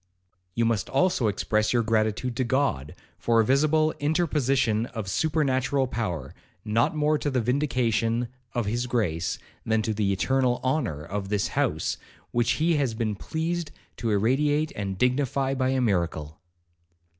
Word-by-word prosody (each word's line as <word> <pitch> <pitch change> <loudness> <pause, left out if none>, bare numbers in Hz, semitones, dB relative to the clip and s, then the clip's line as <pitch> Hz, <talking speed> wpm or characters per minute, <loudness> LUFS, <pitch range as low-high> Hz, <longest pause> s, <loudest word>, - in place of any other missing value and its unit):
'You 115 - +2
must 115 -4 0
also 135 -4 +2
express 105 +1 +1
your 120 -1 +3
gratitude 110 +2 0
to 130 - +2
God, 120 - 0 0.2
for 115 -1 +2
a 110 - +4
visible 155 +5 +3
interposition 135 -7 +1
of 110 -6 -6
supernatural 135 - +1
power, 90 - -3 0.3
not 115 +7 +1
more 150 0 +2
to 145 - -1
the 130 -2 0
vindication 120 -2 +1 0.3
of 120 -3 0
his 120 +4 -1
grace, 90 -9 -1 0.3
than 110 0 +1
to 110 - -1
the 105 -2 0
eternal 125 +5 +1
honour 130 - -1
of 95 +4 -4
this 105 -1 0
house, - - 0 0.3
which 120 0 +2
he 165 +1 +2
has 130 -6 0
been 110 -2 -1
pleased 160 - -3 0.3
to 115 - -2
irradiate 145 +9 +2
and 100 -2 -3
dignify 135 +3 +1
by 130 -1 0
a 130 0 +1
miracle.' 85 -8 -1
120 Hz, 150 wpm, -26 LUFS, 110-140 Hz, 0.3 s, a